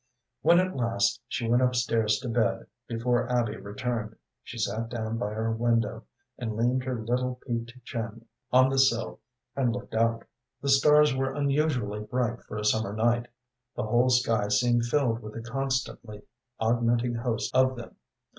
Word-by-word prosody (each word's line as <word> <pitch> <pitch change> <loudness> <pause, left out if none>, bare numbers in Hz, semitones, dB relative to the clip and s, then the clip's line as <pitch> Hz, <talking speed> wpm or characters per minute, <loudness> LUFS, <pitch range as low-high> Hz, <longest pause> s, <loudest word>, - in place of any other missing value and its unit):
When 170 +1 +6
at 185 -2 0
last 115 -2 0
she 120 -1 -3
went 120 +2 +3
up 125 0 +2
stairs 115 -3 +2
to 130 - -5
bed, 115 -1 0 0.2
before 120 +1 0
Abby 120 -3 +1
returned, 110 +1 -4 0.3
she 125 - -10
sat 110 +1 -2
down 115 -1 -3
by 105 - -1
her 110 +1 -1
window, 115 0 0 0.3
and 110 -4 -3
leaned 125 +3 +1
her 130 -3 -2
little, 125 +3 -1
peaked 120 -1 -3
chin 115 -1 -5 0.3
on 130 +1 +6
the 135 0 +1
sill 120 -4 +2 0.4
and 130 -3 +1
looked 125 0 -6
out. 115 0 +1 0.4
The 140 - -3
stars 150 +1 +5
were 135 0 -1
unusually 140 -7 0
bright 120 +1 -2
for - - -7
a 105 - -3
summer 105 -1 +1
night; 120 +2 +1 0.5
the - - -2
whole 120 +4 +2
sky 115 -4 +2
seemed 120 +3 +2
filled 120 -2 +1
with 110 0 -9
a 115 - -5
constantly 130 -4 -3 0.4
augmenting 120 +1 +1
host 115 -1 -2
of 130 0 +4
them. 120 -1 -10
120 Hz, 165 wpm, -27 LUFS, 115-125 Hz, 0.5 s, When